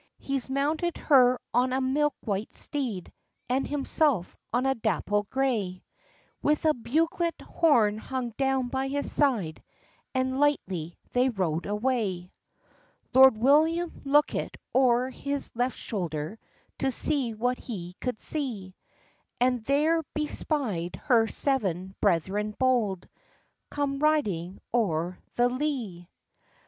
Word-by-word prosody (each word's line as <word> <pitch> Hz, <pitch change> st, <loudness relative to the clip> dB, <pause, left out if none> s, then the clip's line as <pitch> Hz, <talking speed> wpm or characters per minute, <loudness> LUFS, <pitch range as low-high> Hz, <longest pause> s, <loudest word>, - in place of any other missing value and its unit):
— -, -, -54 dB
He's 275 Hz, -2 st, -3 dB
mounted 300 Hz, +5 st, 0 dB
her 255 Hz, -4 st, +5 dB
on 250 Hz, +1 st, +3 dB
a 260 Hz, -, +1 dB
milk 275 Hz, +2 st, +1 dB
white 205 Hz, 0 st, -3 dB
steed, 240 Hz, -11 st, -3 dB, 0.3 s
And 260 Hz, +2 st, 0 dB
himself 285 Hz, -, +1 dB, 0.2 s
on 245 Hz, +2 st, +1 dB
a 270 Hz, -, +3 dB
dapple 210 Hz, -3 st, -1 dB
grey, 225 Hz, -9 st, -1 dB, 0.6 s
With 300 Hz, +1 st, +1 dB
a 310 Hz, -, +5 dB
bugelet 325 Hz, +7 st, 0 dB
horn 230 Hz, -11 st, +2 dB
hung 250 Hz, 0 st, -4 dB
down 265 Hz, +1 st, 0 dB
by 265 Hz, +1 st, -1 dB
his 285 Hz, +1 st, -2 dB
side, 225 Hz, -, +1 dB, 0.5 s
And 260 Hz, +1 st, 0 dB
lightly 185 Hz, -, 0 dB
they 250 Hz, +1 st, +3 dB
rode 180 Hz, -7 st, -1 dB
away. 210 Hz, -5 st, -1 dB, 0.8 s
Lord 265 Hz, -2 st, +8 dB
William 315 Hz, +8 st, +3 dB
lookit 290 Hz, +2 st, +1 dB, 0.2 s
o'er 255 Hz, 0 st, +3 dB
his 280 Hz, +1 st, -3 dB
left 245 Hz, +2 st, -1 dB
shoulder, 175 Hz, -1 st, -4 dB, 0.4 s
To 270 Hz, -, +1 dB
see 260 Hz, -3 st, 0 dB
what 245 Hz, +3 st, 0 dB
he 180 Hz, -7 st, -7 dB
could 250 Hz, -4 st, -3 dB
see, 230 Hz, -11 st, -3 dB, 0.7 s
And 250 Hz, -2 st, +2 dB
there 305 Hz, +5 st, +3 dB
be 305 Hz, 0 st, 0 dB
spy'd 215 Hz, -, -1 dB
her 230 Hz, -3 st, +4 dB
seven 190 Hz, -, -1 dB
brethren 205 Hz, +3 st, +1 dB
bold, 230 Hz, -8 st, +1 dB, 0.6 s
Come 280 Hz, -1 st, -2 dB
riding 205 Hz, -, 0 dB
o'er 180 Hz, -6 st, 0 dB, 0.2 s
the 240 Hz, 0 st, +4 dB
lee. 245 Hz, -, -3 dB
250 Hz, 125 wpm, -27 LUFS, 205-275 Hz, 0.8 s, Lord